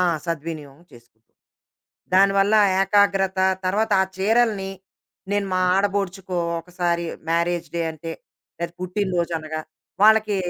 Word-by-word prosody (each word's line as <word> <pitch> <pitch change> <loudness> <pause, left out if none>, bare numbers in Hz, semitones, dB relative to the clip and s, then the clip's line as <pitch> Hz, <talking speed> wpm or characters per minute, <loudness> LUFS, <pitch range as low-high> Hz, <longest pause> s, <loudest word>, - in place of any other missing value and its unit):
ఆ! - - +4 0.2
సద్వినియోగం 155 -2 -5
చేసుకుంటా. 115 -1 -21 0.8
దానివల్ల 195 +2 +4 0.3
ఏకాగ్రత, 195 -1 +2 0.3
తర్వాత 210 +4 0
ఆ - - +4
చీరలని, 210 -1 +1 0.6
నేను 205 -1 0
మా 185 - +1
ఆడబొడుచుకో 195 -2 -1 0.2
ఒకసారి, 175 -1 -2 0.2
మ్యారేజ్ 170 0 0
డే 170 - 0
అంటే, 165 +1 -7 0.5
లేదు 170 0 -3
పుట్టిన 190 +2 -2
రోజనగా, 160 -2 -3 0.4
వాళ్ళకి 215 -1 +5
185 Hz, 110 wpm, -22 LUFS, 170-200 Hz, 0.8 s, వాళ్ళకి